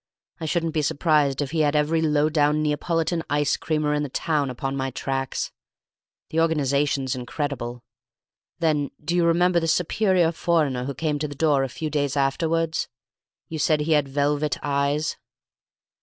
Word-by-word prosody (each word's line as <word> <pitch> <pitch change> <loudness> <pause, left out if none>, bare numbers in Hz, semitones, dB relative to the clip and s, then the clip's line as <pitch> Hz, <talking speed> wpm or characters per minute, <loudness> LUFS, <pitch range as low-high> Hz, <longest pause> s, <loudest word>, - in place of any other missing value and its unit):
I 160 - -4
shouldn't 165 0 0
be 155 - +1
surprised 145 -2 +2
if 140 - -6
he 165 - -1
had 150 -1 +2
every 155 +2 +2
low 150 -1 +2
down 150 -1 +2
Neapolitan 165 +3 0
ice 145 0 +2
creamer 155 -2 -1
in 150 - 0
the 145 - -3
town 150 0 0
upon 135 +2 -3
my 135 -1 -1
tracks! 135 +1 -3 0.8
The 160 - 0
organization's 140 -4 +1
incredible. 125 -1 -4 0.7
Then 155 -4 +1 0.2
do 170 - 0
you 175 - +3
remember 175 +1 +3
the 165 - -2
superior 180 0 +2
foreigner 155 -7 0
who 140 0 -4
came 150 +1 -1
to 150 - -1
the 145 - -8
door 145 -2 +2
a 135 - -2
few 155 +5 -5
days 145 -1 0
afterwards? 160 +4 0 0.6
You 160 - -5
said 150 0 +2
he 155 +2 -1
had 150 -3 +3
velvet 145 +2 0
eyes." 145 +2 0
150 Hz, 165 wpm, -24 LUFS, 140-160 Hz, 0.8 s, you